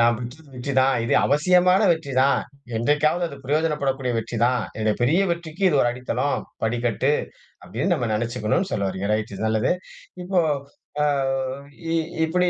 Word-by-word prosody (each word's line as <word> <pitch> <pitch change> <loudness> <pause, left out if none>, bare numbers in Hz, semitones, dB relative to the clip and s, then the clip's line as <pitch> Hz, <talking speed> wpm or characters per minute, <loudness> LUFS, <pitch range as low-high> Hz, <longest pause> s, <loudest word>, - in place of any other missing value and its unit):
தான். 130 +2 0
இது - - +1
அவசியமான 180 +6 +4
வெற்றி 145 -4 -4
தான். 140 +1 +3 0.4
என்றைக்காவது 150 +8 +2
அது 140 - -9
பிரயோஜனப்படக்கூடிய 140 -4 0
வெற்றி 115 +1 -4
தான். 125 -1 +2 0.2
என்னோட 110 -1 +1
பெரிய 155 +10 +3
வெற்றிக்கு 170 +2 -5
இது 150 - +2
ஒரு 120 - +3
அடித்தளம், 125 +3 -1 0.2
படிக்கட்டு 120 +4 0 0.5
அப்பிடின்னு 125 - -1
நம்ப 125 -7 -1
நினைச்சிக்கணுனு 115 - -1
சொல்ல 100 -1 0
வர்றீங்க. 95 +1 -3
ரைட் 110 -1 -2
நல்லது. 110 +2 +1 0.5
இப்போ 185 0 +1 0.6
அ - - +3 0.9
இ - - +2 0.3
இப்பிடி 180 +2 +1
135 Hz, 135 wpm, -23 LUFS, 115-160 Hz, 0.9 s, அவசியமான